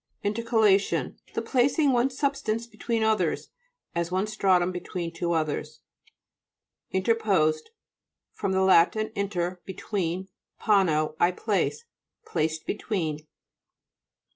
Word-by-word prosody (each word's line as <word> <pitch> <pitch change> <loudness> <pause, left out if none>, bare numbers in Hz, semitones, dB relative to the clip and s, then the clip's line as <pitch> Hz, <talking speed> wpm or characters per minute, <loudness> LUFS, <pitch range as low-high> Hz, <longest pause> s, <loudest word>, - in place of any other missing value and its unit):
INTERCALATION 215 -2 +2 0.2
The - - -1
placing 275 +3 +2
one 245 +2 +3
substance 270 -4 -1
between 230 -1 -2
others, 220 0 +1 0.4
as 170 0 -2
one 185 +2 +1
stratum 190 -4 +2
between 180 -1 -5
two 170 +1 -1
others. 155 -2 -2 1.1
INTERPOSED 190 -6 +1 0.6
fr. - - -4
lat. 190 -2 +4
inter, 200 -5 -2
between, 190 -1 -3 0.3
pono, 160 -8 +2
I 175 - +5
place. 205 - -1 0.4
Placed 160 - -2
between. 160 -8 -3
190 Hz, 95 wpm, -26 LUFS, 170-220 Hz, 1.1 s, I